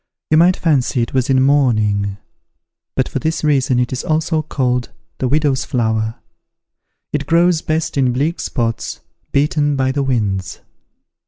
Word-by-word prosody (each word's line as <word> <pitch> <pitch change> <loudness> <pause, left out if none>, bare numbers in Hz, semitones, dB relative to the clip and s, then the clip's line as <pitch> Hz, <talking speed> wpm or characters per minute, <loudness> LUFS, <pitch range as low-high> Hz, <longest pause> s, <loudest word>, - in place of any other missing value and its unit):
You 155 - +5
might 175 +3 +5
fancy 135 -6 +1
it 115 - -6
was 130 -1 0
in 130 -1 +4
mourning; 110 -8 +2 0.8
and - - +2
for - - -3
this 160 0 -2
reason 140 -4 +2
it 125 +1 -1
is 125 - -3
also 160 0 0
called 125 -5 -1 0.3
the 130 - 0
widow's 145 -1 +1
flower. 110 -2 -1 1.0
It 145 -1 -2
grows 170 0 +3
best 160 0 -2
in 130 -2 +3
bleak 145 +7 -1
spots, 115 -4 -3 0.3
beaten 145 +1 +1
by 130 -1 +1
the 140 +1 -1
winds." 100 -8 -1
135 Hz, 150 wpm, -18 LUFS, 120-155 Hz, 1.0 s, You